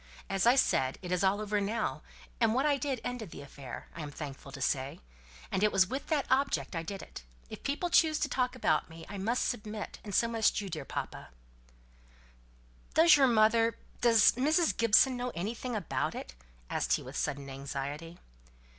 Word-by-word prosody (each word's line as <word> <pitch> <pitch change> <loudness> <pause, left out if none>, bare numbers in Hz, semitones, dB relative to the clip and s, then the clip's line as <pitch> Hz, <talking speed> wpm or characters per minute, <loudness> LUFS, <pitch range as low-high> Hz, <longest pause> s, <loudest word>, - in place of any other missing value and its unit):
As 195 +3 +2
I 245 - +7
said, 130 - +2
it's 180 0 -1
all 195 +2 +3
over 210 -1 -1
now; 215 +2 -2 0.4
what 235 +4 +2
I 290 -2 +3
did 270 -2 -2
ended 245 -6 -4
the - - -9
affair, 135 -2 -9
I 170 - -6
am 150 - -5
thankful 140 -2 -8
to 140 - -8
say; 135 +1 -1 0.5
and 190 - 0
it 210 - +4
was 190 -1 +4
with 265 +8 -5
that 300 -3 +1
object 260 - +1
I 165 - -1
did 195 +4 -6
it. - - -10 0.3
If - - -8
people 320 +5 -2
choose 315 -2 +4
to 300 - +2
talk 255 -2 -1
about 255 - +1
me, 165 0 -11
I 200 -1 -7
must 230 +6 0
submit; 215 -2 -5
and 205 -2 -5
so 230 - +4
must 225 -2 +2
you, 200 -2 -5
dear 155 -5 -5
papa." - - -5 1.7
"Does 330 +1 +8
your 275 -2 +5
mother 225 0 +3 0.2
does 230 -3 +6
Mrs. 310 +7 +2
Gibson 230 +3 +4
know 245 0 -3
anything 225 +7 -3
about 200 -7 -2
it?" 60 - -7 0.3
asked - - 0
he - - 0
with - - -9
sudden 140 0 -2
anxiety. 140 +4 -6
215 Hz, 185 wpm, -31 LUFS, 165-250 Hz, 1.7 s, Does